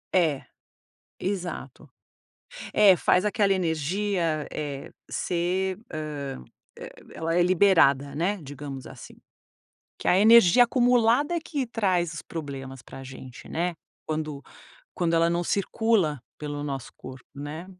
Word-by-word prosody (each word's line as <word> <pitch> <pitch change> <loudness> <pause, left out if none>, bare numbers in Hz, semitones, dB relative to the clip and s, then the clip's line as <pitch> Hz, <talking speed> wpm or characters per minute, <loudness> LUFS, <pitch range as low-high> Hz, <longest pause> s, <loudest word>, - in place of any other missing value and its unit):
É, 160 -7 +2 0.8
exato. 175 -7 -5 0.9
É, 205 -3 +7
faz 180 +3 +2
aquela 205 -1 +2
energia, 170 -1 -1
eh, 145 -2 -5 0.2
ser, 185 +2 -1 0.2
hã, 145 - -5 0.3
e - - -8 0.3
ela 165 +1 -2
é 175 - +5
liberada, 165 -7 +4
né, 180 +7 0
digamos 140 -2 -8
assim. - - -12 0.8
Que - - -7
a 180 - +5
energia 225 +1 +7
acumulada 245 +4 +3
é 340 - 0
que 285 -4 -3
traz 185 -7 0
os - - -6
problemas 135 -5 -7
pra 135 - -11
gente, 130 -1 -11
né? 175 +1 -1 0.3
Quando 155 -2 -3 0.5
quando 170 -2 +1
ela 165 0 +4
não 170 0 0
circula 200 - +1 0.2
pelo 145 -1 -5
o - - -4
nosso 135 -3 -5
corpo, 130 -1 -11
né? 145 +4 -7
170 Hz, 130 wpm, -26 LUFS, 145-195 Hz, 0.9 s, É